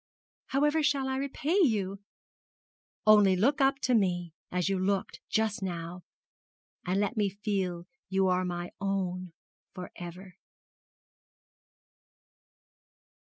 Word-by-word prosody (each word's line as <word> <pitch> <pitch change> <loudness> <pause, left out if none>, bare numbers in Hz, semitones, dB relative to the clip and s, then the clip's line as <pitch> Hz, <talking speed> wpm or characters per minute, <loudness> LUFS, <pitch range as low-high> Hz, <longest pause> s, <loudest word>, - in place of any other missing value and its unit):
'However 295 +3 +2
shall 280 -3 +1
I 265 0 -1
repay 280 +6 0
you?' 200 - +1 1.1
'Only 210 -3 +7
look 275 +10 +2
up 270 0 +4
to 255 - +1
me 175 -6 +1 0.2
as 180 0 0
you 195 -1 +1
looked 195 +1 -1
just 220 0 0
now, 175 -1 -4 0.8
and 185 +2 0
let 205 +3 0
me 205 -2 +2
feel 190 -4 -2 0.2
you 190 0 +2
are 185 0 +2
my 175 -1 -4
own 185 -2 -2 0.4
for 180 -2 -7
ever.' 180 +1 -9
195 Hz, 110 wpm, -29 LUFS, 180-230 Hz, 1.1 s, Only